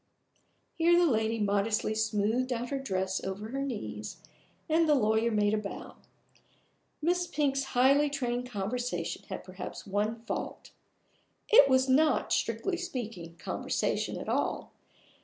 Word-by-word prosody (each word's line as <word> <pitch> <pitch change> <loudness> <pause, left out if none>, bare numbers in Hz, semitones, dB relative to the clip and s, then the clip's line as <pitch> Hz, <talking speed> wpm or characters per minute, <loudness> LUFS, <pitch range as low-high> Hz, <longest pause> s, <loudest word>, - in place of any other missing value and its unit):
Here 340 +1 +4
the 350 - +5
lady 225 -5 +1
modestly 210 +1 +1
smoothed 220 +3 0
out 245 0 -2
her 275 - -2
dress 190 -7 -2
over 195 +3 -5
her 270 +3 -3
knees, 110 - -5 0.5
and 320 0 +3
the 300 - +6
lawyer 220 -2 +2
made 210 -1 +2
a 215 - +2
bow. 205 -1 -8 1.1
Miss 355 +2 +1
Pink's 275 -3 0
highly 280 +4 +5
trained 250 -3 -2
conversation 205 -4 -3
had - - -5
perhaps 185 0 -8
one 205 +3 0
fault - - -5 0.8
it 285 -10 +8
was 260 0 +4
not, 300 +4 +3
strictly 385 -3 0
speaking, 230 - -6
conversation - - -2
at - - -7
all. - - -1
235 Hz, 135 wpm, -30 LUFS, 205-275 Hz, 1.1 s, it